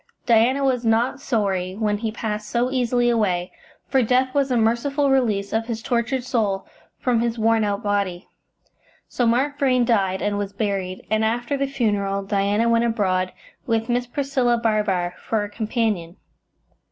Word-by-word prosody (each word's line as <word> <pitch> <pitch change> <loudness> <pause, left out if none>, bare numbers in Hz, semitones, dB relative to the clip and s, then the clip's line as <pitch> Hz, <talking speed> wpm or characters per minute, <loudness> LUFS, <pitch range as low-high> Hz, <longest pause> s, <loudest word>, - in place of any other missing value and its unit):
Diana 240 +4 +3
was 255 -3 +1
not 230 +4 +1
sorry 195 -8 -1
when 210 -1 0
he 220 0 -2
passed 215 -1 -4
so 245 +2 0
easily 245 -1 +1
away, 190 -6 +1 0.4
for 265 - +2
death 255 +2 +2
was 280 -1 +1
a 250 - +1
merciful 270 +6 +1
release 215 -7 +1
of 225 +1 0
his 225 -2 -4
tortured 245 +2 0
soul 210 -6 -1 0.3
from 245 -3 +1
his 235 0 -1
worn 225 0 +2
out 200 -1 -1
body. 200 -3 -1 0.8
So 245 - 0
Mark 275 +5 +1
Vrain 255 -4 +3
died, 195 -5 +1
and 205 0 0
was 200 -1 -4
buried, 195 -3 -3
and 220 0 +2
after 240 +4 0
the 275 0 -1
funeral 205 -7 -1
Diana 200 +3 +1
went 230 0 +3
abroad, 190 -6 0 0.4
with 225 -1 0
Miss 245 0 0
Priscilla 260 -2 0
Barbar 210 -6 0
for 220 -2 -1
a 205 - -5
companion. 215 -6 -2
225 Hz, 165 wpm, -22 LUFS, 205-245 Hz, 0.8 s, Diana